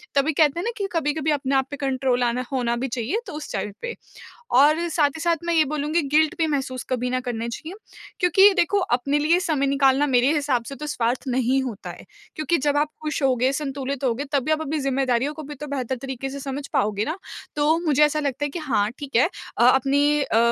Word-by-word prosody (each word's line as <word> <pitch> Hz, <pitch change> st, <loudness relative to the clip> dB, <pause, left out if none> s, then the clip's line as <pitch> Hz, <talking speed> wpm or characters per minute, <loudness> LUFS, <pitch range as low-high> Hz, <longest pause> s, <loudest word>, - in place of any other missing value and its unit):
तभी 285 Hz, +3 st, +2 dB
कहते 300 Hz, +1 st, +3 dB
हैं 350 Hz, -, -3 dB
ना 470 Hz, -, 0 dB
कि 400 Hz, -2 st, -2 dB
कभी-कभी 310 Hz, -1 st, 0 dB
अपने 275 Hz, -2 st, 0 dB
आप 265 Hz, 0 st, +2 dB
पे 285 Hz, -, -5 dB
कंट्रोल 260 Hz, -2 st, 0 dB
आना 245 Hz, +1 st, 0 dB
होना 245 Hz, -3 st, 0 dB
भी 250 Hz, +3 st, -2 dB
चाहिए 245 Hz, -, -2 dB
तो 370 Hz, -, -7 dB
उस 300 Hz, 0 st, -7 dB
चाइल्ड 210 Hz, -, -3 dB
पे। 475 Hz, -1 st, -4 dB, 0.6 s
और 290 Hz, +5 st, +5 dB
साथ 300 Hz, -3 st, +2 dB
ही -, -, -6 dB
साथ 340 Hz, 0 st, +2 dB
मैं 340 Hz, -, 0 dB
ये 320 Hz, -2 st, +5 dB
बोलूँगी 300 Hz, +3 st, 0 dB
गिल्ट 315 Hz, +2 st, +4 dB
भी 325 Hz, -2 st, +1 dB
महसूस 265 Hz, -4 st, -2 dB
कभी 250 Hz, -1 st, -1 dB
ना 255 Hz, 0 st, 0 dB
करना 235 Hz, -2 st, -3 dB
चाहिए। 315 Hz, +10 st, -7 dB, 0.4 s
क्योंकि 385 Hz, +3 st, +6 dB
देखो 395 Hz, +1 st, +2 dB
अपने 280 Hz, -4 st, 0 dB
लिए 320 Hz, +4 st, +3 dB
समय 300 Hz, -6 st, 0 dB
निकालना 275 Hz, +1 st, +3 dB
मेरे 255 Hz, 0 st, +3 dB
हिसाब 280 Hz, -5 st, 0 dB
से 275 Hz, -, -7 dB
तो 300 Hz, +2 st, -6 dB
स्वार्थ 245 Hz, -3 st, -1 dB
नहीं 260 Hz, +1 st, +1 dB
होता 235 Hz, -6 st, -6 dB
है। -, -, -10 dB, 0.3 s
क्योंकि 310 Hz, +2 st, +1 dB
जब 290 Hz, 0 st, +1 dB
आप 295 Hz, +1 st, +1 dB
खुश 305 Hz, 0 st, -3 dB
होगे, 255 Hz, -1 st, +2 dB
संतुलित 275 Hz, -1 st, -4 dB
होगे 255 Hz, +2 st, 0 dB
तब 280 Hz, -3 st, +1 dB
भी 310 Hz, -, 0 dB
आप 310 Hz, 0 st, +1 dB
अपनी 310 Hz, 0 st, -2 dB
ज़िम्मेदारियों 270 Hz, 0 st, 0 dB
को 310 Hz, -, -8 dB
भी 295 Hz, +1 st, -8 dB
तो 295 Hz, +2 st, -7 dB
बेहतर 265 Hz, -2 st, -2 dB
तरीके 270 Hz, 0 st, -5 dB
से 280 Hz, +1 st, -6 dB
समझ 275 Hz, +1 st, -5 dB
पाओगे 210 Hz, 0 st, +1 dB
ना। 315 Hz, +4 st, -3 dB, 0.4 s
तो 300 Hz, +2 st, +3 dB
मुझे 300 Hz, -1 st, +4 dB
ऐसा 300 Hz, +1 st, 0 dB
लगता 290 Hz, -1 st, -2 dB
है -, -, -2 dB
कि 310 Hz, -, -5 dB
हाँ, 235 Hz, -9 st, 0 dB
ठीक 280 Hz, -3 st, -7 dB
है, 255 Hz, +8 st, +5 dB, 0.3 s
अ 235 Hz, -, +5 dB
अपनी 285 Hz, +3 st, +2 dB
अ, 265 Hz, -5 st, 0 dB
280 Hz, 230 wpm, -23 LUFS, 260-305 Hz, 0.6 s, क्योंकि